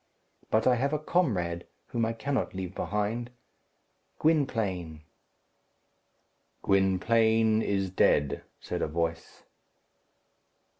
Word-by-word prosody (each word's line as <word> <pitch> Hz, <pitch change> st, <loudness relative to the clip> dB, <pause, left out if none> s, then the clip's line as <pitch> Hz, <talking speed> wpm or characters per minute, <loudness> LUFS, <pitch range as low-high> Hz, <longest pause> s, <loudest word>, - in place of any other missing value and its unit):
But 110 Hz, +1 st, +2 dB
I 125 Hz, -1 st, +4 dB
have 140 Hz, +4 st, 0 dB
a -, -, +2 dB
comrade, 105 Hz, -, 0 dB, 0.2 s
whom 115 Hz, -1 st, 0 dB
I 115 Hz, -, -2 dB
cannot 130 Hz, -2 st, -2 dB
leave 95 Hz, -1 st, -4 dB
behind 105 Hz, +5 st, -2 dB, 0.9 s
Gwynplaine." 105 Hz, -, 0 dB, 1.6 s
"Gwynplaine 110 Hz, +3 st, +3 dB
is 95 Hz, -3 st, -1 dB
dead," 70 Hz, -6 st, +2 dB, 0.2 s
said -, -, -4 dB
a -, -, +1 dB
voice. 80 Hz, +1 st, -3 dB
110 Hz, 95 wpm, -28 LUFS, 90-120 Hz, 1.6 s, I